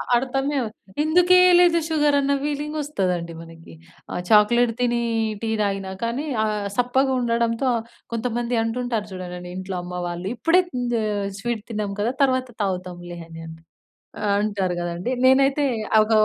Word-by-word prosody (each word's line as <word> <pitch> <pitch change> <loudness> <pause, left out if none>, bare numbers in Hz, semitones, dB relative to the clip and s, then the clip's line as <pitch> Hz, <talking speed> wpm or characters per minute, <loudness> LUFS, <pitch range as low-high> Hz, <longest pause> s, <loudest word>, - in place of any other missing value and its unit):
అర్థమే 270 +3 0
అవు 225 - -3 0.3
ఎందుకేయలేదు 355 +1 +6
షుగర్ 295 -3 +2
అన్న 280 0 +1
ఫీలింగ్ 295 +1 -3
వస్తదండి 180 - -2
మనకి. 165 0 -13 0.4
ఆ - - -4
చాక్లెట్ 230 +3 +5
తిని 240 -1 +1 0.4
టీ 225 - -2
తాగినా 195 -2 -1
కానీ 240 +6 -2 0.2
ఆహ్. 210 -2 -1
సప్పగా 260 +3 +2
ఉండడంతో 235 +1 0
ఆహ్, 225 - -2 0.3
కొంతమంది 235 +1 -1
అంటుంటారు 225 -2 -2
చూడండండి. 180 -1 -7
ఇంట్లో 185 0 -4
అమ్మ 180 0 -5
వాళ్ళు 175 +2 -5
ఇప్పుడే 330 +10 +4
హ్మ్, 245 -1 -2 0.2
ఆహ్, 205 -2 -1
స్వీట్ 230 -1 -3
తిన్నాం 210 -2 -2
కదా! 235 +4 0
తర్వాత 255 -1 +1 0.2
తాగుతాంలే 180 -2 -4
అని 165 0 -10
అని 160 0 -10 0.7
ఆహ్, 200 -1 +2
అంటారు 195 -4 -1
కదండీ. 175 +7 -3
నేనైతే 275 +2 +4 0.4
ఒక 215 - -4
230 Hz, 145 wpm, -23 LUFS, 190-265 Hz, 0.7 s, ఎందుకేయలేదు